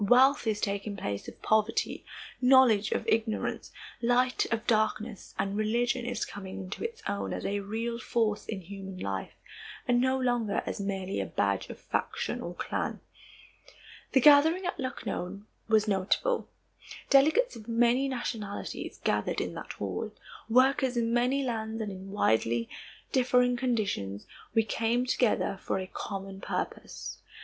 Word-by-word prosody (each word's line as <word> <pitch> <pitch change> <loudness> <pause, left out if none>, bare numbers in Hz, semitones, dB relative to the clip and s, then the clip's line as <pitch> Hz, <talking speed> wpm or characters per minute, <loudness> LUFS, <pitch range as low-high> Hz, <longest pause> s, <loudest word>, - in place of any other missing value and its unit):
Wealth 255 +4 +5
is 215 -1 +1
taking 200 0 -2
place 100 - -4
of - - -10
poverty, 220 +1 +1 0.4
knowledge 250 -5 +6
of - - -1
ignorance, 220 -1 0 0.3
light 250 +1 +2
of 230 0 -1
darkness, 215 -1 0
and 195 +1 -1
religion 235 +3 +1
is 245 - -1
coming 190 -2 -8
into 190 +1 -6
its 460 -1 -5
own 200 - -2
as - - -4
a 205 +1 0
real 225 +4 -3
force 220 -2 0
in 205 -3 -4
human 195 +1 -8
life 95 - -4 0.5
and 245 -1 +4
no 260 +1 +2
longer 240 -5 +1
as - - -3
merely 195 - -2
a 95 - -3
badge 100 +3 0
of - - -7
faction - - -2
or 175 - -6
clan. - - -2 1.1
The 265 - +5
gathering 310 +6 +6
at 355 - -2
Lucknow 200 -7 -4 0.2
was 220 -1 +3
notable. 205 - +1 0.6
Delegates 315 - +5
of 215 0 -11
many 240 +3 +3
nationalities 225 -5 -4
gathered - - +1
in - - -2
that - - -7
hall. - - -4 0.4
Workers 260 +1 +4
in 230 0 +1
many 250 +3 +2
lands 225 -3 -2
and 215 -2 -3
in 190 0 -8
widely 115 - +1 0.4
differing 250 -1 +3
conditions, 210 - -1 0.3
we 225 - +5
came 230 +3 0
together 240 -6 +1
for - - -1
a 190 - -3
common 195 0 -6
purpose. - - -4
225 Hz, 145 wpm, -29 LUFS, 200-250 Hz, 1.1 s, knowledge